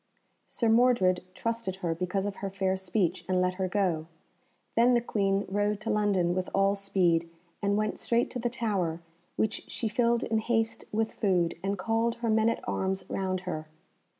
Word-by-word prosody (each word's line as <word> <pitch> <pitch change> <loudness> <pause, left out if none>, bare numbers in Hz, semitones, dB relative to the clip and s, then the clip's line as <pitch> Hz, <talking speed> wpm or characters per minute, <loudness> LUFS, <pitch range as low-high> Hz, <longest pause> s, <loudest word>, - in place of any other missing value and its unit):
Sir 235 - -1
Mordred 225 -6 +4
trusted 230 -4 -2
her 175 -3 -2
because 180 +3 -2
of 205 -1 -4
her 195 - -3
fair 190 -1 0
speech, 190 -1 -1
and 185 -1 +2
let 180 0 +2
her 185 - +1
go. 180 -5 0 0.7
Then 245 +2 +5
the - - +5
Queen 200 -3 0
rode 205 +1 0
to 225 - -2
London 200 -5 +2
with 185 0 -2
all 195 0 +4
speed, 185 -4 +1 0.3
and 200 0 +1
went 215 0 -1
straight 235 0 +1
to 250 - -4
the 240 0 0
Tower, 200 -9 -1 0.4
which 220 -1 0
she 230 - -2
filled 235 +2 +2
in 220 -1 +1
haste 225 0 0
with 220 +1 0
food, 180 -5 +1
and 200 +1 -1
called 225 +4 0
her 235 -1 -1
men 220 +1 +4
at 230 - -3
arms 190 0 -1
round 185 -1 -1
her. 155 -4 -5
200 Hz, 180 wpm, -29 LUFS, 185-225 Hz, 0.7 s, Then